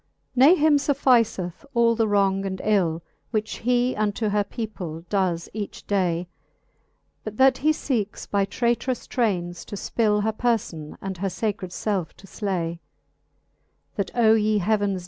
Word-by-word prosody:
XIX. - - -20
Ne 280 +8 +8
him 305 -2 +4
fufficeth 250 - +1
all 235 0 +4
the 225 -1 +1
wrons; 195 -1 +2
and 190 -1 -4
ill, 170 -6 +1 0.3
Whiche 215 -1 -2
he 245 +1 +1
unto 215 +1 0
her 205 0 +2
people 200 -7 -6
does 185 -4 0
each 210 -1 -6
day, 180 -3 0 1.0
But 215 -1 -7
that 265 -1 +5
he 305 - +2
feekes 235 -9 -2
by 200 -1 +1
traytrous 235 +3 -1
traines 175 -8 -1
to - - -7
ipill 210 0 +1
Her 220 +1 0
perlbn, 210 -10 -2
and 190 -2 -5
her 195 - -1
facred 200 -1 -3
felfe 185 -1 -2
to - - -16
flay: 175 -5 -3 1.2
That 200 -2 -2
O 225 -2 +5
ye 215 -1 +2
heavens 205 -1 +1
210 Hz, 150 wpm, -24 LUFS, 190-235 Hz, 1.2 s, Ne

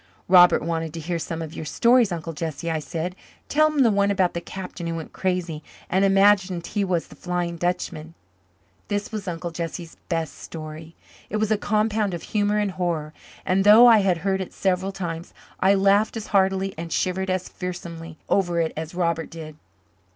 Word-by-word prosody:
"Robert 180 -3 +7
wants 165 0 -2
to 165 - -5
hear 170 +2 -3
some 165 0 -4
of 160 0 -8
your - - -6
stories, 235 +6 +3
Uncle 165 -1 -4
Jesse," 160 +1 -4
I 160 - -1
said. 165 +4 -4 0.3
"Tell 310 +1 +4
him 295 -3 +2
the 230 - +4
one 200 0 +2
about 190 -3 +2
the 170 - -3
captain 180 -2 -7
who 165 - -2
went 165 -1 -7
crazy 180 -4 -2 0.3
and 190 +2 +3
imagined 195 -2 +3
he 205 -1 -1
was 180 -3 0
the - - -15
Flying 175 -1 -3
Dutchman." 165 -2 -3 0.7
This 205 0 -2
was 210 -3 -5
Uncle 170 0 -4
Jesse's 165 0 -6
best 165 -2 -2
story. 155 0 -9 0.3
It 215 - -1
was 215 0 0
a - - +5
compound 210 -2 0
of 170 - -8
humour 210 0 0
and 205 -2 0
horror, 170 -4 -2 0.3
and 190 +1 +2
though 215 +4 +9
I 230 -3 +8
had 190 -3 +2
heard 190 -1 +1
it 185 - -6
several 190 0 0
times, 170 -3 -6 0.2
I 195 +1 +4
laughed 200 +3 +3
as 220 - -5
heartily 190 0 +2
and 165 0 -6
shivered 190 +2 -1
as 185 -1 -1
fearsomely 170 -3 -7
over 175 -3 +1
it 160 -1 0
as 160 +2 -6
Robert 170 -2 -1
did. 155 -2 -9
180 Hz, 190 wpm, -24 LUFS, 165-195 Hz, 0.7 s, though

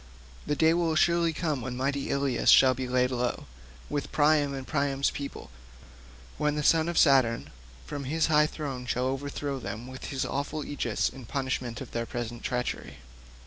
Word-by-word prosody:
The 150 - +1
day 160 +2 +4
will 170 -2 +1
surely 170 0 +3
come 155 -4 -2
when 125 +1 -5
mighty 140 +1 -1
Ilius 140 -3 +1
shall 130 -1 +7
be 130 0 -4
laid 125 0 +2
low, 125 -1 -2 0.4
with 145 - -3
Priam 150 -1 +3
and 135 -1 -5
Priam's 140 -2 0
people, 140 - -7 0.9
when 150 0 +1
the 150 - -1
son 160 +2 +4
of 170 - -3
Saturn 130 -6 +4 0.3
from 140 - -5
his 160 +3 +1
high 150 -1 +4
throne 135 -6 -5
shall 125 +1 0
overshadow 140 +1 -3
them 115 -1 -6
with 130 0 -8
his 135 -2 -2
awful 145 +2 -3
aegis 145 - -1
in 130 -4 -8
punishment 130 -3 -3
of - - -8
their 115 0 -3
present 120 -1 -5
treachery. 125 - -3
140 Hz, 175 wpm, -28 LUFS, 125-150 Hz, 0.9 s, shall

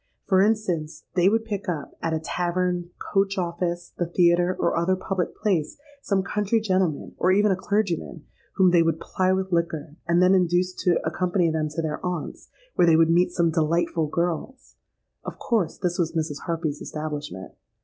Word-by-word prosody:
For 190 -2 +4
instance, 190 -7 0
they 180 +1 +4
would 225 +1 +1
pick 205 -3 -4
up, 155 -5 -4
at 165 - -1
a 160 - 0
tavern, 175 +1 -1
coach 195 0 0
office, 175 0 -3
the 175 - 0
theatre, 175 +1 +3
or 170 - +1
other 170 +3 +2
public 185 -1 -3
place, 180 -8 -1 0.2
some 195 -6 0
country 210 +3 0
gentleman, 185 -7 -1
or 185 - +3
even 205 +2 +4
a - - +3
clergyman, 190 -5 -2 0.3
whom 185 -2 +4
they 175 -1 +5
would 165 -1 +1
ply 185 +2 0
with 190 0 -1
liquor, 165 -3 -2
and 170 0 +3
then 180 +1 +5
induce 180 0 +2
to 175 -2 +4
accompany 175 +1 +1
them 155 -1 -1
to 160 +2 -3
'their 150 -1 -3
aunt's,' 180 -4 -5 0.2
where 175 - +3
they 165 - +6
would 165 0 +4
meet 175 +1 +3
'some 170 -2 +1
delightful 160 0 +1
girls.' 175 - -3 0.5
Of - - -7
course 215 -10 -1
this 180 -2 -2
was 165 -1 0
Mrs. 155 -3 -3
Harpy's 165 -3 -2
establishment. 150 -10 -6
175 Hz, 180 wpm, -24 LUFS, 165-190 Hz, 0.5 s, they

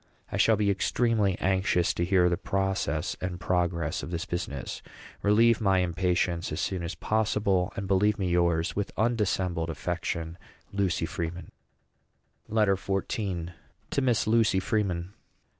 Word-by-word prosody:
I - - -2
shall 110 - +5
be 105 -1 +2
extremely 105 -1 +1
anxious 95 -3 +1
to 85 - -1
hear 90 0 +4
the 85 - +2
process 95 +1 -1
and 90 -1 -3
progress 85 -2 0
of - - -6
this 85 +1 -3
business. 85 -8 -4 0.4
Relieve 115 +3 +4
my 95 -3 +3
impatience 90 -1 0
as 75 - -3
soon 95 0 -1
as 85 +1 -4
possible; 105 -3 +1
and 100 - -4
believe 100 +2 +3
me 95 - -1
yours 85 -2 +1
with 100 -1 -2
undissembled 95 -7 0
affection. 80 +2 -3 0.3
LUCY 95 -4 0
FREEMAN. 85 +1 -5 1.0
LETTER 105 -3 +3
XIV. 95 -2 -3 0.4
TO 140 - +1
MISS 125 -4 +2
LUCY 110 -3 +3
FREEMAN. 95 -3 -1
95 Hz, 140 wpm, -28 LUFS, 85-105 Hz, 1.0 s, shall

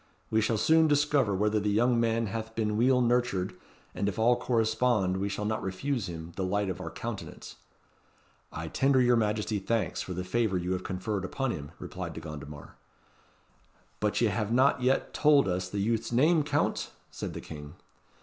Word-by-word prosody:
We 110 0 +3
shall 110 +1 +1
soon 160 +7 +4
discover 145 -7 +2
whether 105 +2 +1
the 105 0 -1
young 120 +3 +3
man 115 0 +1
hath 110 +2 -5
been 105 -2 0
weel 125 +3 +3
nurtured, 120 -6 +1 0.4
and 100 - -1
if 95 - -6
all 120 +2 +4
correspond 115 -5 +1
we 100 +1 -1
shall 105 +1 -3
not 110 +1 -1
refuse 100 +3 -2
him 80 0 -7
the 95 - -2
light 100 +1 0
of - - -6
our - - -5
countenance." - - -7 0.9
"I 80 0 -5
tender 135 +9 +2
your 125 -1 +4
Majesty 105 -1 0
thanks 115 +3 -1
for 90 - -5
the 90 - -3
favour 95 +1 0
you 90 +1 -2
have 95 0 -2
conferred 95 +1 -3
upon 135 +7 -2
him," 70 -8 -7
replied - - -6
De - - -6
Gondomar. 75 -2 -9 1.2
"But 105 -1 0
ye 115 - +4
have 105 0 -2
not 130 +2 +3
yet 130 +2 +1
tauld 145 -2 +5
us 90 0 -1
the 100 - -5
youth's 115 +3 0
name, 155 +7 +4
Count?" 145 - 0 0.2
said - - -6
the - - -4
King. 75 -1 -9
110 Hz, 185 wpm, -29 LUFS, 95-120 Hz, 1.2 s, tauld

